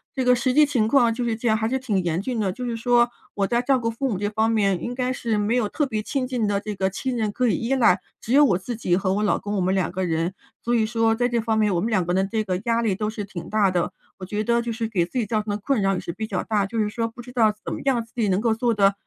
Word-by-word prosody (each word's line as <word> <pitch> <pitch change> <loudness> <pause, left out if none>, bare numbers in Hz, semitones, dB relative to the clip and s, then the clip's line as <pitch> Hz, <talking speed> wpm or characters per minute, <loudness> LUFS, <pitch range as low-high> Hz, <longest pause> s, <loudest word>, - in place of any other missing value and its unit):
这 260 -1 -1
个 250 - +6
实 255 +1 0
际 300 +3 +6
情 240 -7 +1
况 235 -2 +4
就 245 +1 -3
是 230 -2 0
这 235 +1 -3
样， 220 - +4
还 220 +1 0
是 265 - 0
挺 210 -8 -1
严 170 0 0
峻 235 +2 -3
的。 195 -3 0
就 250 +3 -6
是 235 -1 -2
说， 240 +1 +3 0.3
我 200 -1 +1
在 240 +3 +1
照 265 +1 +2
顾 230 -2 -1
父 265 +4 -2
母 200 - -1
这 205 +1 -1
方 220 +1 +1
面 200 -5 +1
应 245 +1 -4
该 255 0 -1
是 230 -3 -1
没 210 +3 +1
有 220 -4 +1
特 295 - 0
别 215 -5 -2
亲 260 +3 -2
近 245 -4 -1
的 200 -1 +1
这 210 0 -5
个 190 -1 0
亲 255 +6 -3
人 215 -3 -1
可 250 +3 0
以 - - +2
依 245 +4 0
赖， 225 -7 +4 0.2
只 235 - -3
有 295 +1 +7
我 195 -10 +3
自 230 +6 -5
己 180 -5 +1
和 190 -1 0
我 210 - 0
老 210 - +2
公 205 0 -5
我 - - +1
们 185 +2 +1
两 185 -2 0
个 185 0 -2
人。 165 +3 -1 0.3
所 240 - 0
以 220 -2 +2
说， 225 -1 +2
在 245 +2 0
这 235 -1 0
方 220 0 0
面 210 -3 +2
我 - - +1
们 225 +5 -1
两 190 -4 +2
个 175 - -2
人 190 +1 +1
这 220 -1 0
个 185 -2 -2
压 230 0 +2
力 210 -5 +1
都 215 +1 -2
是 210 -2 -5
挺 180 -4 -8
大 210 -3 +2
的。 175 -2 -1 0.2
我 185 - -7
觉 210 +3 -2
得 235 +1 +2
就 235 - -3
是 225 0 -2
给 180 -6 0
自 250 +8 -3
己 215 - -1
造 215 -1 0
成 210 - -4
的 205 - -1
困 255 -8 +1
扰 195 0 +2
也 180 - -2
是 170 - -5
比 220 +5 -5
较 195 -4 -3
大， 210 -3 0
就 225 +3 -3
是 210 -1 +1
说 230 +1 -2
不 235 +2 -10
知 250 +1 -11
道 220 -4 +3
怎 - - -5
么 - - -5
样 245 -4 +2
自 225 - -22
己 225 -4 +1
能 190 +1 +2
够 230 0 +2
做 235 +1 0
得， 200 -1 +4
220 Hz, 360 characters per minute, -23 LUFS, 200-240 Hz, 0.3 s, 有